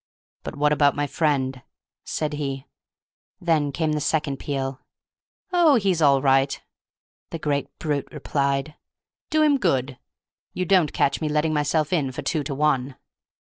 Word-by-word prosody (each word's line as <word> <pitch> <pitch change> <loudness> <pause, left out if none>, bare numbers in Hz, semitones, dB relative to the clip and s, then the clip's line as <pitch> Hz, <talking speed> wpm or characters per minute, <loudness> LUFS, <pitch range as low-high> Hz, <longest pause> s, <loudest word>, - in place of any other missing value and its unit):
"But - - -7
what 150 0 +2
about 145 -1 +3
my 145 - 0
friend?" 135 -4 0 0.4
said 150 -1 -3
he. 135 -2 -4 0.7
And 175 - -17
then 150 -3 +2
came 160 +1 -1
the 150 0 -1
second 145 -1 0
peal. 135 -1 -3 0.7
"Oh, 335 -5 +5
he's 190 -7 +1
all 140 -2 +4
right," 135 0 +3 0.7
the - - -5
great 145 -3 -1
brute 145 -3 -2
replied; 140 0 -1 0.6
"do 310 0 +3
him 290 -2 +3
good! 135 - 0 0.6
You 185 - -1
don't 180 -5 +3
catch 140 - 0
me 155 - -1
letting 150 +1 +1
myself 150 +2 0
in 145 -6 +1
for 130 - -6
two 155 -4 -1
to 140 - -3
one!" 135 -3 0
150 Hz, 155 wpm, -24 LUFS, 140-160 Hz, 0.7 s, Oh